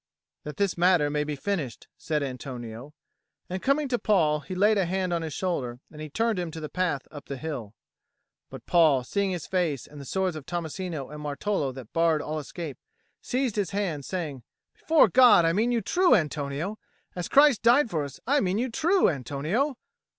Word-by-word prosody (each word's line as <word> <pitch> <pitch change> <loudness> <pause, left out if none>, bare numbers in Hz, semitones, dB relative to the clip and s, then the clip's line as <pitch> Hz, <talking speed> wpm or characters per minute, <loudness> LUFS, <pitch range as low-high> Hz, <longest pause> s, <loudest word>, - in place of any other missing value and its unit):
"That 150 - -7
this 200 -3 0
matter 175 -5 +4
may 150 0 0
be 150 0 -3
finished," 145 - -3
said 155 -2 -2
Antonio; 125 0 -7 0.6
and, 185 0 -3
coming 280 +2 +1
to 245 -2 0
Paul, 160 -8 +2
he 185 +4 -7
laid 205 +2 +4
a 190 - +2
hand 185 0 -1
on 170 - 0
his 160 -3 -5
shoulder 130 -10 -2
and 155 -1 -8
turned 225 -3 +1
him 175 -2 -3
to 160 0 -7
the 155 -1 -6
path 170 -5 -1
up 145 -2 -10
the 140 - -5
hill. 125 -8 -6 0.7
But - - -10
Paul, 155 -7 +4
seeing 200 - -1
his 175 -4 -4
face 170 -8 -1
and 145 -1 -11
the - - -9
swords 190 +2 -1
of 155 -3 -8
Tommasino 170 -3 -4
and 150 0 -8
Martolo 145 0 -1
that 125 -5 -10
barred 165 -2 +2
all 155 +1 -3
escape, 150 0 -7 0.4
seized 250 -4 -1
his 200 -4 0
hand, 185 -8 -2
saying, 155 -6 -4 0.3
"Before 320 -1 +4
God, 250 -9 +6
I 165 - +3
mean 225 +6 +1
you 235 -2 +1
true, 355 - +4
Antonio! 155 +3 -2 0.4
As 180 -2 -3
Christ 280 -5 +5
died 240 +1 +4
for 155 -3 0
us, 140 -2 -8
I 285 +4 +3
mean 190 -3 0
you 245 +2 -1
true, 340 - +3
Antonio!" 160 - -1
170 Hz, 195 wpm, -27 LUFS, 145-200 Hz, 0.7 s, God